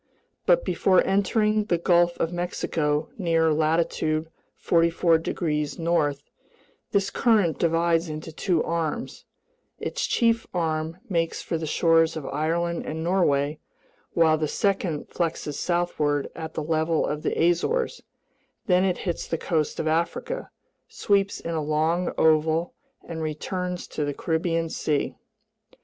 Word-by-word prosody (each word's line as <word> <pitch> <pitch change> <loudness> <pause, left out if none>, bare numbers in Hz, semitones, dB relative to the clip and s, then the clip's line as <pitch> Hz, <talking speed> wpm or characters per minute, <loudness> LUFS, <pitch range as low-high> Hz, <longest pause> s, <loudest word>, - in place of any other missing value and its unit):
But - - +4
before 185 -1 +3
entering 210 +2 +2
the 175 -5 +1
Gulf 175 0 +3
of 165 - -1
Mexico 160 -3 -1
near 165 -3 +2
latitude 155 0 0 0.3
44 165 0 +3
degrees 150 -3 -2
north, 155 -4 0 0.7
this 200 -1 +1
current 215 -9 +2
divides 165 0 +2
into 155 +1 -6
two 170 +1 0
arms; 170 +7 -3 0.5
its - - -2
chief 230 -2 +2
arm 160 -1 -1
makes 165 -5 -1
for - - -3
the 160 -1 -3
shores 165 0 +3
of 150 - -6
Ireland 165 +4 -1
and 160 +1 -4
Norway 150 -5 +1 0.5
while 160 -2 +4
the 155 - 0
second 185 -4 -1
flexes 160 -3 -2
southward 155 -5 0
at 160 -1 -7
the 155 - -2
level 160 +1 +1
of 150 0 -3
the - - -1
Azores; 470 - 0 0.6
then 180 -3 +3
it 185 -2 +1
hits 175 -3 -2
the 165 - -1
coast 155 -3 -1
of 155 - -1
Africa, 170 - -1 0.4
sweeps 200 -1 0
in 170 - -4
a 160 - -1
long 160 +4 0
oval, 160 +2 +3 0.3
and 165 -1 -5
returns 180 +4 -3
to 150 - -3
the 145 -1 -2
Caribbean 165 0 0
Sea. 150 -2 -1
165 Hz, 135 wpm, -25 LUFS, 155-175 Hz, 0.7 s, But